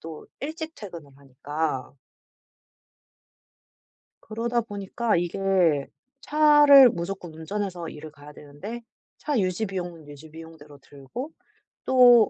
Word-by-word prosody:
또 160 -1 -9
일찍 315 +3 -5
퇴근을 170 -8 -10
하니까. 140 +1 -4 2.3
그러다 235 +2 -2
보니까 210 +1 -2
이게 175 -4 +1 0.3
차를 295 -4 +7
무조건 175 -2 -6
운전해서 175 +1 -4
일을 155 0 -9
가야 145 0 -14
되는데 150 +13 -9 0.4
차 295 -4 -1
유지 185 +2 0
비용은 175 -5 -6
유지 145 +2 -12
비용대로 160 -3 -13
들고 145 - -9 0.5
또 245 -4 +7
180 Hz, 235 characters per minute, -25 LUFS, 155-235 Hz, 2.3 s, 차를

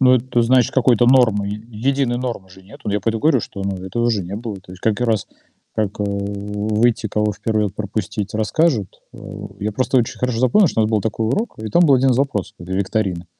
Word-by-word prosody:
Но, 130 -1 +6
это 125 0 0
значит, 125 0 +3
какой-то 120 -2 +4
нормы, 115 -6 +4
е 105 +1 -5
единой 125 +2 0
нормы 120 -7 -4
же 95 0 -16
нету. 105 +1 -8
Я 105 +1 0
поэтому 110 +2 -1
говорю, 145 -7 +3
что, 100 - -7
ну, 100 0 -2
этого 120 +6 0
же 105 -5 0
не 95 +4 -6
было. 110 -2 -5
То 90 - -14
есть 90 - -11
как 110 +1 0
и - - +3
раз, 110 -4 0 0.5
как, 105 -1 -2
э, - - 0
выйти, 105 +3 -1
кого 105 +1 0
в - - -21
1 110 -1 +1
ряд 100 -1 -3
пропустить, 105 -1 -3
расскажут. 110 - 0
Э, - - -12 0.4
я 105 +1 -2
просто 130 +3 +1
очень 115 - 0
хорошо 125 -2 -1
запомнил, 130 - +4
что 110 - 0
у - - +4
нас 105 - 0
был 110 -2 +2
такой 110 +1 -1
урок, 210 - -2
и 110 - -4
там 175 +11 +4
был 140 -4 +6
1 130 0 +3
запрос 120 -7 -1
как 85 - -11
бы 95 - -4
викторины 95 -2 -1
110 Hz, 235 wpm, -20 LUFS, 100-125 Hz, 0.5 s, Но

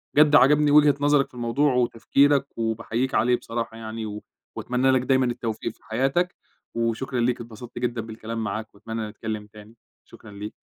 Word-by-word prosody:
بجد 150 0 +6
عجبني 145 +3 +5
وجهة 150 -1 +6
نظرك 145 -1 +3
في - - -36
الموضوع 125 +4 +1
وتفكيرك، 135 +3 +2
وباحييك 115 +3 -1
عليه 125 +3 +3
بصراحة 115 -1 -5
يعني، 110 -2 -6 0.3
وأتمنى 125 +2 +1
لك 130 -1 +3
دايمًا 130 0 +2
التوفيق 115 -2 -3
في - - -31
حياتك، 135 +10 0 0.4
وشكرًا 115 +3 -1
ليك، 120 0 0
اتبسطت 120 +1 -9
جدًا 120 -1 -1
بالكلام 110 0 -6
معاك، 110 +1 -5
وأتمنى 110 +1 -5
نتكلّم 110 -1 -6
تاني. 105 +1 -15 0.3
شكرًا 105 - -14
ليك. 105 +1 -7
120 Hz, 160 wpm, -24 LUFS, 110-130 Hz, 0.4 s, بجد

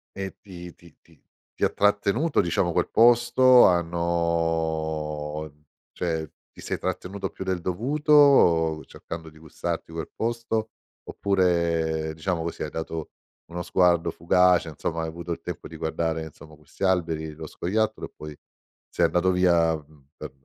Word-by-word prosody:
E 95 -1 -5
ti 90 -3 -11
ti 85 -2 -19
ti - - -24 0.4
ti - - -5
ha - - +4
trattenuto, 105 +9 +1
diciamo, 85 0 0
quel 90 +1 0
posto, 120 +2 +6
hanno 80 -3 -1 0.4
cioè 80 -3 -3 0.2
ti - - -14
sei - - -3
trattenuto 95 +2 -4
più - - -7
del 95 -2 -2
dovuto, 115 - +3
cercando 80 -1 -9
di 80 - -18
gustarti 80 +1 -5
quel 80 -2 -6
posto, 115 -1 -2 0.4
oppure 85 -4 0
diciamo 80 +1 -2
così, 85 - -5
hai 75 - -2
dato 80 0 -5 0.4
uno 85 +1 -5
sguardo 85 -3 +2
fugace? 90 0 +3
Insomma, 80 +2 -4
hai 80 - -3
avuto 85 +2 -7
il 85 - -4
tempo 90 0 -7
di 80 - -10
guardare 80 0 -2
insomma, 75 0 -15
questi 75 +5 -11
alberi, 80 -4 0
lo 80 +1 -8
scoiattolo, 110 +7 -2
e - - -14
poi 75 -1 -9 0.5
sei - - +1
andato 90 +1 +2
via, 85 -3 +3 0.4
per - - -8
85 Hz, 145 wpm, -25 LUFS, 80-95 Hz, 0.5 s, posto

